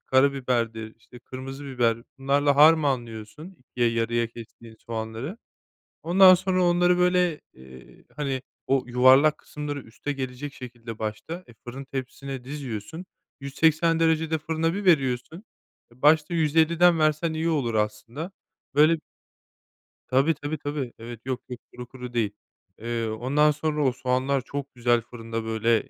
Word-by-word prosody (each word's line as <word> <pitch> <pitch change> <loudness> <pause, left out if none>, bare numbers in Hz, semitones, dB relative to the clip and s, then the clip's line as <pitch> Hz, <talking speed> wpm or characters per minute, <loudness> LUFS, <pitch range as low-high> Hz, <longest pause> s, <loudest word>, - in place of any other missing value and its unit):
karabiberdir, 125 -5 +1
işte, 120 +2 -16
kırmızı 135 +3 -8
biber, 120 -4 +1 0.2
bunlarla 140 +1 +2
harmanlıyorsun 145 - +2
2'ye 125 -1 -1
yarıya 115 +1 0
kestiğin 115 0 -13
soğanları. 115 - -5 0.6
Ondan 185 +3 +7
sonra 185 0 +1
onları, 175 0 +3
böyle, 180 -3 +2
eee, 65 0 -15
hani, 135 -3 -2 0.2
o 135 -1 +2
yuvarlak 130 +5 +5
kısımları 145 -1 -6
üste 120 +6 -6
gelecek 135 +1 -5
şekilde 120 -3 -9
başta, 110 +12 -5
e, 120 - -16
fırın 125 +4 -9
tepsisine 135 0 -6
diziyorsun. 140 - -6 0.3
180 160 +4 +2
derecede 160 0 +2
fırına 160 +2 -1
bir 205 - -4
veriyorsun 150 - +1 0.5
e, 125 - -26
başta 155 +3 +4
150'den 165 +2 +4
versen 155 +1 +1
iyi 160 +1 -1
olur 135 -8 0
aslında. 110 - -3 0.4
Böyle 155 +3 +5 1.1
Tabii, 135 +5 +3
tabii, 150 +1 -5
tabii. 145 -4 -4
Evet, 115 0 -8
yok, 130 -1 -3
yok. 125 -1 -6
Kuru 125 0 -9
kuru 125 -1 -9
değil. 110 -4 0 0.5
Eee, 115 0 -2
ondan 130 +8 +2
sonra 150 0 -1
o 130 - +3
soğanlar 130 +2 0
çok 140 +2 -6
güzel 120 -1 +2
fırında 115 -1 -6
böyle 110 0 +1
135 Hz, 135 wpm, -25 LUFS, 120-155 Hz, 1.1 s, Ondan